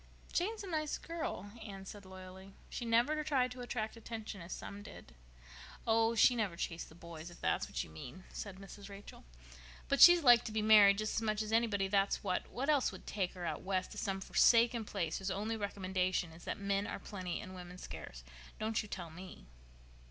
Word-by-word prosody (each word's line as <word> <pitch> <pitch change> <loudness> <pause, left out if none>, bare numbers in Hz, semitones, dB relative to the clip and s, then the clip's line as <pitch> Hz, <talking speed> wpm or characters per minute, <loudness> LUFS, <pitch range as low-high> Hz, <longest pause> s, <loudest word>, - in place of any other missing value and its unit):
"Jane 400 +6 +1
is 430 - -8
a - - -6
nice 310 -4 -1
girl," 320 - -5
Anne 210 -2 -7
had 195 - -11
said 205 -1 -9
loyally. 190 +1 -11 0.2
"She 240 - -4
never 240 +7 +2
tried 260 -4 +1
to 250 0 -7
attract 230 -3 -3
attention, 220 -3 -7
as 170 +1 -9
some 200 0 -6
did." - - -12 0.7
"Oh, 225 0 +3
she 245 +3 +6
never 210 -7 -1
chased 170 0 -4
the 160 - -15
boys, 170 -1 -9
if 170 - -14
that's - - 0
what - - -3
you - - -12
mean," 125 - -9
said 200 -3 -6
Mrs. 195 +1 -10
Rachel. 200 - -11 0.6
"But 275 - +2
she'd 345 -1 +10
like 240 -3 +8
to - - -4
be 215 0 0
married, 210 -2 +8
just 215 0 -1
as - - +2
much 215 -1 0
as 215 - -5
anybody, 220 -4 +2
that's 195 0 +1
what. 185 -2 -1
What 260 +4 -3
else 290 -4 +3
would - - -11
take 190 -4 -2
her 180 -2 -6
out - - -3
West 185 -1 -1
to - - -6
some 195 -1 -2
forsaken 230 +2 +4
place 170 -6 -2
whose 190 0 -3
only 210 +4 -2
recommendation 185 -4 -1
is 165 +2 -13
that - - -3
men 200 0 0
are - - -4
plenty 185 -4 -5
and 195 -3 -8
women 180 -1 -9
scarce? - - -8 0.3
Don't 220 0 0
you 210 - -10
tell 175 -5 -6
me!" 180 - -10
205 Hz, 210 wpm, -35 LUFS, 185-230 Hz, 0.7 s, she'd